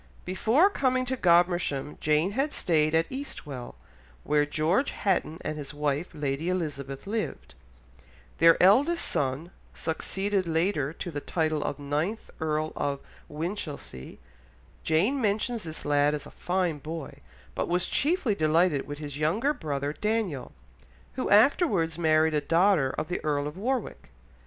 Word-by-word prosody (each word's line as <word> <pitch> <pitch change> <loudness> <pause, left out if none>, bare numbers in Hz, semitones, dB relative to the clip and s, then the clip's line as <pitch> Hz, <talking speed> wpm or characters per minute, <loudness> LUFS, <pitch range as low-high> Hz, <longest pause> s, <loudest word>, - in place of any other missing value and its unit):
Before 230 - +3
coming 255 -6 +1
to 260 +1 -1
Godmersham 175 - +2
Jane 155 +5 +2
had 275 +7 -1
stayed 155 -2 +2
at 165 0 +3
Eastwell, 150 - -6 0.5
where 150 -1 +2
George 160 - +1
Hatton 175 -5 -1
and 155 - -4
his 145 0 -7
wife 145 +3 -1
Lady 145 +3 -2
Elizabeth 140 -7 -3
lived; 215 +2 -4 0.9
their 165 0 +7
eldest 280 - +4
son 140 +5 -2 0.2
succeeded 190 +3 -2
later 160 -3 0
to 175 +2 -6
the 145 -2 -4
title 155 -2 -1
of 140 - -3
ninth 150 +10 -3
Earl 155 0 -1
of 140 -1 -1 0.3
Winchilsea; 150 - -6 0.7
Jane 200 - +2
mentions 220 +2 0
this 160 -3 -6
lad 145 0 +3
as 145 -1 -6
a - - -11
"fine 175 -4 -1
boy," 155 +1 -7 0.3
but - - -2
was 180 +1 +1
chiefly 290 - +1
delighted 155 -3 +2
with 145 - -6
his 145 -1 -6
younger 210 - +1
brother 145 - -3
Daniel, 210 - -2 0.6
who 255 - -2
afterwards 205 - +3
married 160 -1 +3
a 150 - +1
daughter 165 -2 +3
of 155 - -2
the 180 - -3
Earl 145 -2 0
of 150 +1 -5
Warwick. 245 +7 -3
165 Hz, 140 wpm, -27 LUFS, 150-200 Hz, 0.9 s, their